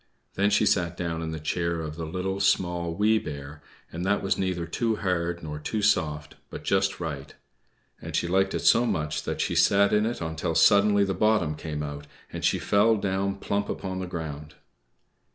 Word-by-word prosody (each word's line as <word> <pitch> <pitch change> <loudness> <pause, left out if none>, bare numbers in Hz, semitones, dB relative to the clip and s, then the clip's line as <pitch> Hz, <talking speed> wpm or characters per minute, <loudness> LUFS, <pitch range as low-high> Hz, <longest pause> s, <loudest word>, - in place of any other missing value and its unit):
Then 100 +1 +2
she 100 - +3
sat 90 -2 +1
down 85 -2 -3
in 80 - -3
the 80 0 -5
chair 85 +2 -1
of 75 -1 -5
the 80 -1 -5
Little, 95 +3 -3
Small, 85 -3 +1
Wee 110 +3 +3
Bear, 75 -2 -8 0.3
and 85 +2 -5
that 100 +2 +1
was 95 - +1
neither 90 -3 -2
too 110 +7 -1
hard 85 -4 -2
nor 75 -1 -5
too 105 +7 -3
soft, 75 -7 +1 0.2
but - - -8
just 95 0 +1
right. 70 -5 -6 0.7
And - - -6
she - - +1
liked 95 +2 +1
it - - -2
so 120 +1 +5
much 75 -7 -1
that - - -2
she - - -1
sat 100 0 +4
in 105 +1 +3
it 120 - -3
until 80 0 -3
suddenly 100 +3 +5
the 95 -1 0
bottom 95 -5 +2
came 75 -1 -5
out, 75 0 -7 0.3
and - - -5
she - - +3
fell 110 +3 +3
down 100 0 -1
plump 100 +1 -2
upon 95 -1 -4
the 95 - -4
ground. 75 -3 -6
90 Hz, 195 wpm, -26 LUFS, 80-100 Hz, 0.7 s, so